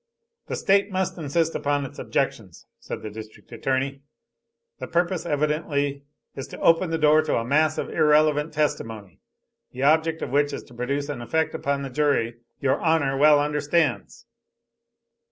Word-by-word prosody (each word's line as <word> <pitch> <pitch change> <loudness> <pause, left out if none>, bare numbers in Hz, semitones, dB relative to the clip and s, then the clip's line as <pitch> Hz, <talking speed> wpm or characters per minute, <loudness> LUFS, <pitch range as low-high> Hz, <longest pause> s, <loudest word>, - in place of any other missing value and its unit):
"The - - -3
State 200 +1 +2
must 190 -1 -1
insist 165 +2 0
upon 145 -1 -1
its 130 - -10
objections," - - -3
said - - -7
the 110 - -6
District 110 +2 -11
Attorney. 135 +3 -2 0.8
"The - - -5
purpose 175 +1 -1
evidently 145 -2 -1 0.3
is 135 - -6
to - - -10
open 165 +2 +3
the 165 - 0
door 155 0 +5
to - - 0
a 115 - -2
mass 155 +4 +2
of - - -2
irrelevant 150 -1 +3
testimony, 115 - -3 0.5
the 130 - -4
object 160 +2 +2
of - - -5
which 145 +1 +2
is - - -5
to 125 - -18
produce 140 +4 -2
an 145 -5 -5
effect 160 +7 -1
upon 140 0 -2
the 135 - -6
jury 125 -5 0 0.2
your 135 -1 +1
Honor 160 -5 +1
well 150 +1 +6
understands." 150 - -1
145 Hz, 160 wpm, -24 LUFS, 135-160 Hz, 0.8 s, well